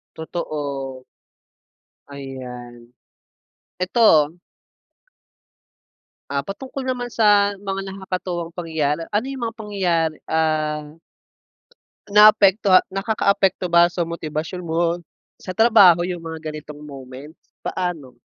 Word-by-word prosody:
Totoo, 140 -5 -5 1.1
ayan. 125 -3 -9 0.9
Ito 180 -6 +4 1.9
ah, 140 0 -1
patungkol 260 - -6
naman 250 -2 -2
sa, 205 -3 +3
mga 195 0 -5
nakakatuwang 185 -3 -5
pangyayari, 160 -2 -2
ano 210 +3 0
yung 260 -3 -7
mga 225 - -10
pangyayari, 180 -7 -1
ah 155 -1 -1 1.1
naapektoha 205 -2 +6 0.2
nakakaapekto 195 -2 +1
ba 170 0 +6
sa 175 -1 -2
motibasyon 165 +1 -5
mo, 170 0 -1 0.6
sa 185 - -8
trabaho 200 -7 +6
yung 175 -2 -5
mga 160 -1 -6
ganitong 150 -1 -9
moments? 135 +2 -11 0.3
Paano? 165 -8 -4
170 Hz, 90 wpm, -21 LUFS, 150-195 Hz, 1.9 s, naapektoha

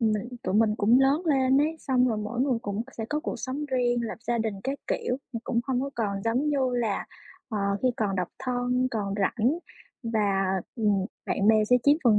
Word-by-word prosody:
mình 215 0 +1
tụi 185 - -2
mình 215 0 +4
cũng 225 +5 +4
lớn 275 +5 +3
lên 265 -3 +4
ấy, 310 +3 +1
xong 255 -3 +2
rồi 220 -3 -1
mỗi 215 +3 -3
người 260 -3 +2
cũng 205 +2 -2
sẽ 225 - -3
có 300 +1 0
cuộc 325 - -3
sống 275 +3 -3
riêng, 245 -3 +1
lập 225 - -5
gia 240 0 +1
đình 220 -2 -1
các 275 +1 -2
kiểu, 250 - -1 0.2
thì 230 - -2
cũng 235 -2 0
hông 260 -2 0
có 275 +1 -3
còn 200 -4 -2
giống 245 +7 +1
như 290 -1 +1 0.2
là, 225 -5 -1 0.4
ờ, 220 -4 -2 0.2
khi 255 - +4
còn 200 -3 0
độc 180 - -1
thân, 250 0 0
còn 205 -4 -2
rảnh 235 - +1 0.4
và, 205 -4 +1 0.3
ừm, 205 -4 +2 0.2
bạn 200 - 0
bè 215 -1 +5
sẽ 250 +4 +5
chiếm 285 +1 +6
phần 220 -3 +6
235 Hz, 215 wpm, -27 LUFS, 215-260 Hz, 0.4 s, chiếm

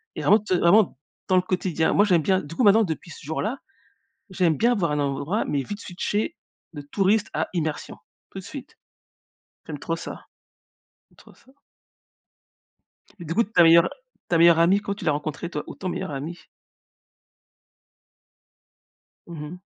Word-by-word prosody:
Et - - -4
vraiment 210 - +5
tu 200 -3 -1
vraiment, 180 -4 +4 0.3
dans 185 - +2
le - - +5
quotidien, 180 -3 0
moi, 205 - +4
j'aime 175 -5 +3
bien 190 +4 +2
du 150 +2 -10
coup, - - +1
maintenant, 215 +1 +6
depuis 170 -2 -5
ce - - -12
jour-là, 205 - -3 0.7
j'aime 175 -5 +1
bien 240 +2 +3
avoir 170 -9 0
un 150 - 0
endroit 145 +8 -1
mais 140 -2 -1
vite 205 - -7
switcher 200 +3 -3 0.4
de 145 - -7
touriste 200 +8 +1
à - - -1
immersion. 155 -3 -3 0.3
Tout - - -9
de - - -15
suite. - - -10 0.9
J'aime 150 -2 -6
trop 165 - -2
ça. - - -9 0.8
J'aime - - -29
trop - - -18
ça. 265 - -24 1.7
Du 165 -2 -5
coup 230 +6 +3
ta 185 -4 +3
meilleure 165 0 +6 0.4
ta 170 - +2
meilleure 170 0 +6
amie 180 +4 +4
comment 200 -1 -4
tu 195 - -9
l'as 155 - +3
rencontrée 150 +3 -4
toi 150 -3 -4
ou - - -8
ton 185 - -5
meilleur 165 - -4
ami? 150 +5 -7 2.8
Mmh 165 -3 -8
mh. 180 +3 -10
175 Hz, 165 wpm, -24 LUFS, 155-200 Hz, 2.8 s, maintenant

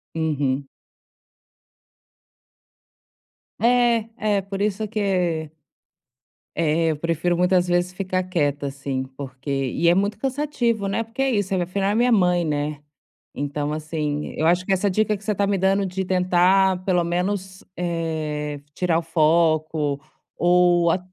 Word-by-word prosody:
Uhum. 145 -4 -1 2.9
É. 235 -1 +3
É, 210 -2 +1
por 195 +1 -5
isso 210 +1 -1
que 180 -7 -1 1.1
eh, 165 +1 +2
eu 150 - -3
prefiro 165 +2 0
muitas 180 0 +3
vezes 175 +1 +1
ficar 185 -1 -2
quieta, 145 -6 -1
assim, 135 -1 -3
porque 135 0 -9
e 135 +4 0
é 170 - +6
muito 200 +2 0
cansativo, 250 -5 -1
né, 225 +4 -1
porque 230 +4 -6
é 270 - +2
isso, 205 -4 0
afinal 190 +2 0
é - - +2
a - - -1
minha 245 +2 +3
mãe, 180 -4 +3
né. 150 -1 -2 0.5
Então 145 +1 -3
assim, 155 -1 -3
eu 155 - 0
acho 175 +2 +3
que 195 - -2
essa 190 +2 +1
dica 215 +2 +1
que 200 - -18
você 210 - 0
tá 200 0 0
me 200 -1 +1
dando, 195 +2 +2
de 190 0 -3
tentar 185 +1 +3
pelo 180 -2 +2
menos, 185 +2 -2
eh, 155 -4 -3 0.2
tirar 175 -3 +1
o - - -4
foco, 155 -2 +1 0.4
ou 175 -1 +4
a 180 - +1
180 Hz, 145 wpm, -23 LUFS, 155-195 Hz, 2.9 s, é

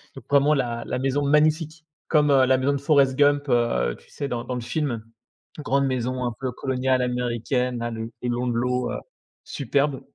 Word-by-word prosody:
Donc - - -11
vraiment 145 +1 +4
la 120 -4 -1
la - - -3
maison 135 +2 0
magnifique 155 +2 +2 0.2
comme, 150 -2 +3
heu, 135 -2 +5
la 130 0 +3
maison 135 +2 +1
de - - 0
Forest 140 -2 +3
Gump, 145 -1 +3
heu, 60 - +1
tu - - -23
sais? 140 - -5
Dans 120 -2 -3
dans 125 - -3
le 125 - -3
film, 120 -4 -2 0.6
grande 140 -2 +1
maison 130 0 -1
un 120 - -2
peu 130 -1 -2
coloniale 130 0 0
américaine 125 0 -1
là, 120 0 -3
le 115 0 -5
long 125 0 -1
de 120 - 0
l'eau, 125 +1 0
heu, - - -3 0.5
superbe. 140 0 -1
130 Hz, 195 wpm, -24 LUFS, 120-140 Hz, 0.6 s, heu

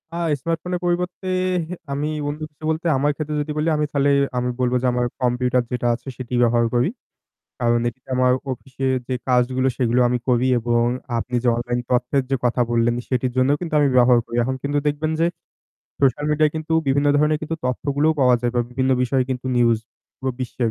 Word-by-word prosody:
আ - - -3 0.2
স্মার্টফোনের 170 +2 -2
পরিবর্তে 180 +2 -2 0.6
আমি 145 +2 -1 0.2
বন্ধু 150 +2 -4 0.3
বলতে 160 +2 -1
আমার 145 +2 +2
ক্ষেত্রে 155 -1 -4
যদি 150 +1 -4
বলি 155 +2 0
আমি 150 - +1
তালে 140 0 +2 0.3
আমি 125 0 0
বলব 125 0 +1
যে 130 - +1
আমার 125 0 +1 0.2
কম্পিউটার 125 0 +1
যেটা 120 -1 -1
আছে 130 - -15
সেটি 125 -1 -7
ব্যবহার 120 0 +3
করি। 125 +8 +3 0.7
কারণ 120 0 +2
এটি 130 +2 -9
আমার 125 0 +3 0.2
অফিস 130 +1 -8
এ - - +3 0.2
যে 130 - -1
কাজগুলো 130 +1 +2
সেগুলো 125 0 +2
আমি 125 0 0
করি 125 +1 +3
এবং 120 0 +1 0.3
আপনি 125 +2 -3
যে - - +3
অনলাইন 120 0 -2
তথ্যের 125 +2 +1
যে 135 - +2
কথা 120 +1 +1
বললেন 120 0 +2
সেটির 125 -1 0
জন্যও 135 +3 +3
কিন্তু 165 -3 -4
আমি 145 - +4
ব্যবহার 125 -1 +6
করি। 120 - -5
এখন 130 +1 -1
কিন্তু 145 +1 0
দেখবেন 150 +2 0
যে 165 - +4 0.7
সোশ্যাল 140 +2 +2
মিডিয়ায় 150 0 +2
কিন্তু 160 +1 -4
বিভিন্ন 140 +2 +2
ধরনের 150 0 +2 0.3
তথ্যগুলোও 145 +4 +1
পাওয়া 125 -1 +5
যায় 120 -1 0
বা 120 - +2
বিভিন্ন 130 +1 0
বিষয়ে 130 +1 +1
কিন্তু 130 0 -3
নিউজ 115 -2 +4 0.4
পুরো 130 -1 -2
বিশ্বের। 120 -2 -1
130 Hz, 190 wpm, -22 LUFS, 120-145 Hz, 0.7 s, ব্যবহার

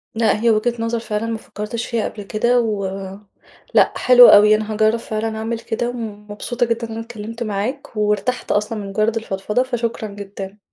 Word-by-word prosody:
لأ 220 -2 +2
هي 235 - +4
وجهة 225 +2 +2
نظر 230 0 -1
فعلًا 215 -1 -3
ما 225 -1 -2
فكرتش 215 +2 -5
فيها 230 -3 -1
قبل 205 - -9
كده، 235 +4 +1
و 215 -4 -1 0.9
لأ - - +4
حلوة 245 -1 +8
أوي 210 +1 +7
أنا 215 0 -3
هاجرّب 215 +2 +3
فعلًا 220 -1 -3
أعمل 225 +1 -3
كده، 235 +1 -2
ومبسوطة 220 0 -4
جدًا 230 0 -2
أنا 225 0 -5
اتكلّمت 230 0 -6
معاك، 220 +6 -4
وارتحت 210 +4 0
أصلًا 210 +2 0
من 200 -1 -6
مجرّد 215 +3 0
الفضفضة، 210 +2 -1
فشكرا 235 -3 -3
جدًا. 200 -1 -8
220 Hz, 175 wpm, -20 LUFS, 210-235 Hz, 0.9 s, حلوة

